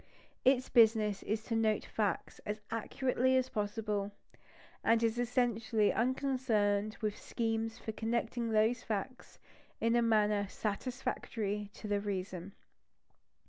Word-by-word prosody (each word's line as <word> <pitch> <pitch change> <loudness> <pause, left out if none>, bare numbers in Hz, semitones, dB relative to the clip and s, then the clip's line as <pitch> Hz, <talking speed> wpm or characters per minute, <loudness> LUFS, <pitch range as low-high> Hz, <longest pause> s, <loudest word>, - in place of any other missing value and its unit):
Its 260 0 +4
business 220 -4 +4
is 220 +1 -2
to 230 - -2
note 220 -1 +2
facts 210 -3 -2
as 210 +1 -3
accurately 255 +3 +1
as 260 0 +1
possible; 210 -1 -2 0.7
and 230 0 +3
it - - +5
is 225 +1 0
essentially 235 -3 +1
unconcerned 230 -5 +1
with 210 -1 -1
schemes 225 -1 -2
for 220 - -5
connecting 230 +1 -1
those 220 +2 +3
facts 225 +4 -5 0.4
in 230 +1 +2
a 240 - +4
manner 210 -3 +3
satisfactory 210 -2 -3
to 215 - -7
the 205 -1 +1
reason. 190 -2 -4
225 Hz, 125 wpm, -33 LUFS, 210-240 Hz, 0.7 s, it